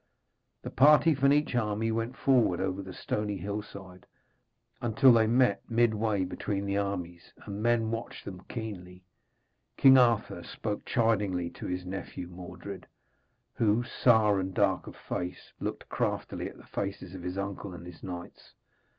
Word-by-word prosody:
The - - -6
party 150 +4 +6
from 140 0 +3
each 150 0 +2
army 110 -1 0
went 115 +3 -2
forward 120 -10 +3
over 95 0 -1
the 95 -1 -8
stony 105 +2 -3
hillside, 100 -1 -7 0.7
until 120 +2 +5
they 110 -1 +4
met 120 -3 +3
midway 110 -4 +2
between 100 +2 -3
the 100 0 -1
armies, 90 -4 -4
and 100 0 -5
men 115 -1 +2
watched 115 0 -5
them 90 -2 -7
keenly. 95 -6 -7 0.7
King 135 -1 +8
Arthur 120 -3 +2
spoke 105 -2 -5
chidingly 100 -7 +1
to - - -7
his 90 0 -3
nephew 90 -1 -6
Mordred, 90 +2 -9 0.7
who, 115 +1 +2
sour 110 -4 +3
and 95 0 -3
dark 100 -2 +2
of - - -9
face, 90 0 -5
looked - - -4
craftily - - -2
at - - -15
the - - -15
faces 95 -2 -5
of 95 - -7
his 90 +2 -4
uncle 100 0 -4
and 85 -1 -9
his 90 -1 -11
knights. 90 -2 -9
100 Hz, 150 wpm, -29 LUFS, 95-115 Hz, 0.7 s, King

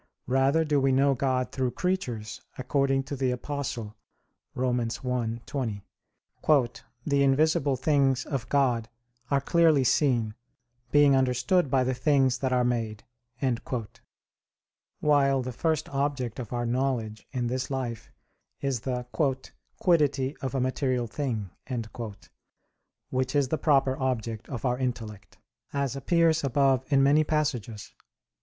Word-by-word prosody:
Rather 135 +5 +2
do 150 -2 +2
we 135 0 +3
know 135 +1 +4
God 130 -1 0
through 130 -2 0
creatures, 120 - -3 0.2
according 135 +1 +1
to 140 +1 -5
the 130 -1 0
Apostle 125 -4 -4 0.6
(Rom. 125 -1 +1
1:20), 115 -1 -3 1.2
"the 140 -2 +2
invisible 140 0 +3
things 135 -1 +2
of 130 -5 -4
God 125 -5 +1 0.4
are 140 - +3
clearly 160 -1 +4
seen, 120 -5 +2 0.6
being 145 -1 +5
understood 130 +5 +2
by 130 0 +3
the 130 +1 0
things 130 -1 +2
that 130 -1 -1
are 125 -1 +3
made": 115 -3 -1 2.0
while 140 -3 +3
the 130 - -4
first 160 +4 0
object 135 -4 -2
of 120 -5 -6
our 120 -1 -1
knowledge 120 -3 -2
in 125 -3 -2
this 130 +2 -2
life 125 -5 -4 0.5
is 135 -3 -1
the 125 +1 -3 0.7
"quiddity 145 -6 +2
of 135 0 -4
a - - +1
material 130 -1 0
thing," 115 - -3 1.6
which 130 +1 -1
is 140 -3 +2
the 160 - 0
proper 135 -3 +3
object 115 -4 -2
of 125 -1 -5
our 125 0 0
intellect, 105 -6 -5 0.4
as 140 -2 -1
appears 165 +3 +2
above 135 -1 +2
in 135 -1 +5
many 145 +3 +5
passages 140 -9 -2
(Q. - - -35
130 Hz, 130 wpm, -27 LUFS, 120-140 Hz, 2.0 s, being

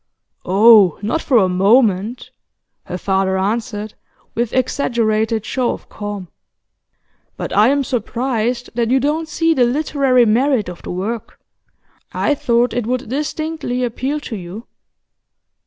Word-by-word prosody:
'Oh, 200 -1 +6
not 315 +10 -1
for 260 - +2
a 195 -4 +4
moment,' 205 +3 +2 0.5
her 180 - -5
father 190 0 0
answered, 210 +1 -2 0.4
with 235 -1 -1
exaggerated 225 -4 0
show 255 -2 -1
of - - -11
calm. 205 -3 -6 1.1
'But - - -5
I 210 +2 +5
am 280 +1 +2
surprised 245 -1 -2
that 230 -1 0
you 265 +2 +3
don't 305 +4 -1
see 330 +1 +1
the 255 - +2
literary 260 -1 +2
merit 235 -1 +2
of 175 - -9
the - - -9
work. 205 +5 -5 0.7
I 295 - +1
thought 240 -3 +1
it 235 -2 -2
would 250 -2 -2
distinctly 300 -2 -3
appeal 260 +5 -2
to 240 - -6
you. 190 +4 -8
235 Hz, 135 wpm, -18 LUFS, 210-260 Hz, 1.1 s, Oh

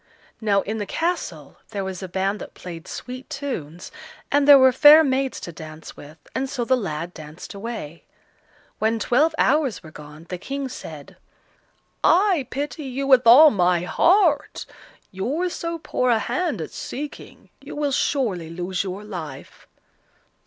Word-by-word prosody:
Now 200 -2 +2
in 220 +3 -4
the 205 - -4
castle 250 - -3
there 200 -3 -4
was 190 -1 -5
a 190 - -5
band 195 +3 -2
that - - -10
played 170 -2 -9
sweet 255 +1 -8
tunes, 180 - -6 0.4
and 285 0 +3
there 285 -1 +10
were 260 -1 +6
fair 295 +4 +8
maids 265 -1 -1
to 170 - -7
dance 155 -1 -10
with, 150 +2 -13 0.2
and 265 +1 -2
so 250 -3 -3
the 260 - +3
lad 175 -6 -4
danced 155 +2 -10
away. 200 -7 -7 0.7
When 220 +1 +1
twelve 295 +9 +2
hours 295 -7 +1
were 155 - -12
gone, 150 +1 -12
the 180 - -5
King 275 +5 -4
said: 155 - -10 0.9
"I 360 -6 +3
pity 290 +2 -4
you 270 +1 -3
with 260 -3 +5
all 290 +6 +9
my 180 -4 +2
heart. 330 - +2 0.5
You're 285 - -2
so 335 0 -4
poor 255 -5 -1
a 235 - +4
hand 310 - -2
at 155 - -6
seeking; 290 +3 -8
you 275 +2 -10
will 295 -1 -1
surely 215 - -1
lose 180 +3 -3
your 195 +1 -6
life." 180 -7 -9
230 Hz, 160 wpm, -23 LUFS, 180-280 Hz, 0.9 s, there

